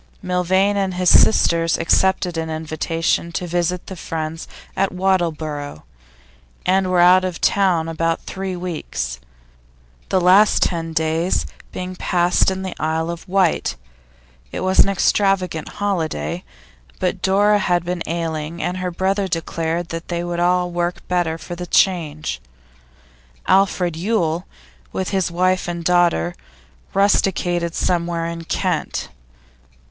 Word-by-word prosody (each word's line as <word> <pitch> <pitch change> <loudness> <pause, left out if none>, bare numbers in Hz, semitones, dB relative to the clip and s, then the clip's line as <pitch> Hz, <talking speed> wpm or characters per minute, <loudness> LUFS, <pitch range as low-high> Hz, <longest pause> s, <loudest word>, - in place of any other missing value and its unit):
Milvain 185 +3 +2
and 190 -2 -1
his 180 -1 +3
sisters 165 -5 +4
accepted 180 +1 +2
an 160 0 -3
invitation 160 +2 -1
to 180 - -2
visit 175 +1 -1
friends 160 0 -4 0.3
at 195 - +1
Wattleborough, 160 - -1 0.8
and 190 0 +2
were 180 -1 +2
out 180 +1 +6
of 180 -3 -3
town 180 -5 +2
about 165 0 -1
three 190 -1 -4
weeks, 160 - -4 0.9
the 190 - +3
last 185 +4 +5
ten 165 -2 -2
days 160 +2 0 0.3
being 185 0 -5
passed 175 0 +2
in 190 0 -3
the 185 - -4
Isle 160 +1 -1
of 170 +2 -9
Wight; 185 -3 +1 0.8
it - - -4
was 185 0 +1
an - - +7
extravagant 195 -4 +1
holiday, 180 -2 -2 0.5
but - - -1
Dora 205 +2 +3
had 175 -3 +1
been 175 0 -3
ailing, 165 0 -3
and 180 +1 -2
her 185 0 -2
brother 190 +3 0
declared 165 0 -2
that 165 0 -6
they 170 -1 -2
would 175 0 -3
all 180 0 +2
work 175 0 -3
better 175 -3 0
for 175 - -8
the 175 0 -6
change. 155 - +1 1.0
Alfred 185 -3 +2
Yule, 175 -2 -1 0.4
with 190 - -2
his 190 -4 +1
wife 185 +2 +1
and 170 -1 -4
daughter, 170 - +2 0.6
rusticated 175 -4 +1
somewhere 170 -1 0
in 165 0 -5
Kent. 170 - -2
175 Hz, 130 wpm, -20 LUFS, 165-185 Hz, 1.0 s, an